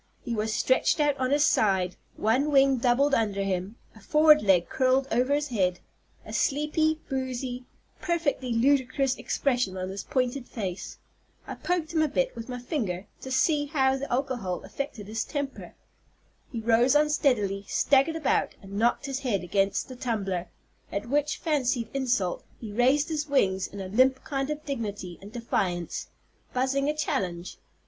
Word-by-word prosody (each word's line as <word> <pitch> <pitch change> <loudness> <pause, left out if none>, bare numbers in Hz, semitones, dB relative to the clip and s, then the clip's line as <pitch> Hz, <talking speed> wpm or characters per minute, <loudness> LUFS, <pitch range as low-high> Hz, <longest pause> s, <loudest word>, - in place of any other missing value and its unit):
He 240 - -3
was 220 0 -1
stretched 260 +7 +2
out 295 -2 +3
on 255 0 0
his 290 +2 +4
side, 190 -8 +2 0.2
one 255 +7 +2
wing 275 -2 +5
doubled 255 +4 +2
under 205 -4 +1
him, 190 +2 -2 0.2
a - - -14
forward 305 +6 +5
leg 190 -4 +3
curled 265 +1 +2
over 250 +4 +2
his 295 0 -1
head, 185 -6 0 0.5
a - - -8
sleepy, 310 +2 +1
boozy, 255 -2 -3 0.4
perfectly 315 -7 -1
ludicrous 260 +2 +2
expression 245 -9 0
on 185 0 -3
his 195 +1 -5
pointed 255 -2 -1
face. 195 -5 -5 0.5
I - - -6
poked 345 -2 -2
him 320 - +2
a 310 - +3
bit - - 0
with 230 +2 -7
my 250 - -4
finger, 220 - -3 0.2
to 260 - -7
see 290 +3 +2
how 265 -3 +2
the 275 +1 -5
alcohol 245 -8 -2
affected 260 -7 -6
his 220 +2 -2
temper. 285 -2 -5 0.8
He 230 - -4
rose 235 +4 +4
unsteadily, 250 -10 +2
staggered 285 +3 +3
about, 320 -4 0
and 200 +1 -6
knocked 235 +3 +2
his 275 -1 -3
head 220 -9 -1
against 195 +2 0
the 255 - -9
tumbler; 195 -8 -2 0.4
at 205 +4 -4
which 295 +2 +1
fancied 260 -7 0
insult 250 -9 0 0.2
he 220 -3 -7
raised 260 +8 +3
his 305 -1 -2
wings 190 -9 +2
in 200 - -10
a 190 - -4
limp 260 +6 +3
kind 275 -1 -2
of 300 0 -4
dignity 205 - -4
and 200 +2 -11
defiance, 185 -7 -2 0.5
buzzing 270 +2 +1
a 305 - -2
challenge. 180 - -2
255 Hz, 165 wpm, -27 LUFS, 205-280 Hz, 0.8 s, wing